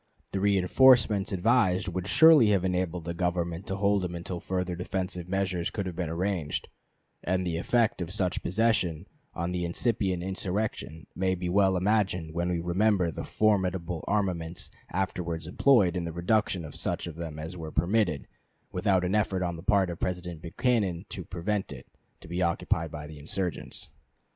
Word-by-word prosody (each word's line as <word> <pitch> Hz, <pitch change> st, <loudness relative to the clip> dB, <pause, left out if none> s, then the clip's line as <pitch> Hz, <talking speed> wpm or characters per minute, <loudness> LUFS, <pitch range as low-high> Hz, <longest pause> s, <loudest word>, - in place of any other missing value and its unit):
The 95 Hz, -, -1 dB
reënforcements 100 Hz, +2 st, +4 dB
advised 95 Hz, -1 st, +2 dB
would 90 Hz, +1 st, -3 dB
surely 160 Hz, -2 st, +7 dB
have 95 Hz, -3 st, +2 dB
enabled 90 Hz, -2 st, -1 dB
the 85 Hz, -, -3 dB
Government 85 Hz, 0 st, -2 dB
to 95 Hz, -, -2 dB
hold 100 Hz, 0 st, +2 dB
them 90 Hz, -1 st, -3 dB
until 85 Hz, +1 st, -5 dB
further 90 Hz, 0 st, -2 dB
defensive 90 Hz, 0 st, -4 dB
measures 95 Hz, -2 st, -1 dB
could 100 Hz, -, -4 dB
have 90 Hz, -2 st, -5 dB
been 85 Hz, -2 st, -2 dB
arranged; 85 Hz, -2 st, -2 dB, 0.5 s
and 90 Hz, +1 st, 0 dB
the 85 Hz, -2 st, -1 dB
effect 115 Hz, +3 st, +1 dB
of 85 Hz, -, -3 dB
such 90 Hz, -2 st, 0 dB
possession 95 Hz, -5 st, +1 dB, 0.3 s
on 85 Hz, +1 st, -2 dB
the 90 Hz, -1 st, -2 dB
incipient 95 Hz, 0 st, 0 dB
insurrection 95 Hz, -4 st, -3 dB
may 95 Hz, 0 st, +1 dB
be 90 Hz, 0 st, -3 dB
well 95 Hz, 0 st, +3 dB
imagined 90 Hz, -4 st, 0 dB
when 85 Hz, +1 st, -1 dB
we 90 Hz, -1 st, 0 dB
remember 90 Hz, +1 st, +2 dB
the -, -, -6 dB
formidable 90 Hz, -5 st, 0 dB
armaments 90 Hz, -5 st, -1 dB, 0.2 s
afterwards 85 Hz, -3 st, -2 dB
employed 95 Hz, -, +4 dB
in 90 Hz, -2 st, -2 dB
the 85 Hz, -, -4 dB
reduction 90 Hz, +1 st, 0 dB
of 75 Hz, -, -10 dB
such -, -, -2 dB
of 85 Hz, -3 st, -7 dB
them 80 Hz, -2 st, -6 dB
as 80 Hz, +3 st, -6 dB
were 80 Hz, -3 st, -7 dB
permitted, 85 Hz, -1 st, +1 dB, 0.4 s
without 95 Hz, -1 st, +1 dB
an 90 Hz, -, -1 dB
effort 100 Hz, -3 st, +1 dB
on 85 Hz, -1 st, -2 dB
the 80 Hz, -, -8 dB
part 100 Hz, -2 st, +2 dB
of 85 Hz, -, -7 dB
President 90 Hz, -3 st, -3 dB
Buchanan 95 Hz, -1 st, 0 dB
to 95 Hz, -, -5 dB
prevent 95 Hz, +4 st, -3 dB
it, -, -, -9 dB, 0.4 s
to -, -, -12 dB
be 90 Hz, +1 st, -3 dB
occupied 85 Hz, -1 st, 0 dB
by 75 Hz, -1 st, -7 dB
the 75 Hz, -1 st, -10 dB
insurgents. 85 Hz, +3 st, -4 dB
90 Hz, 170 wpm, -28 LUFS, 85-100 Hz, 0.5 s, surely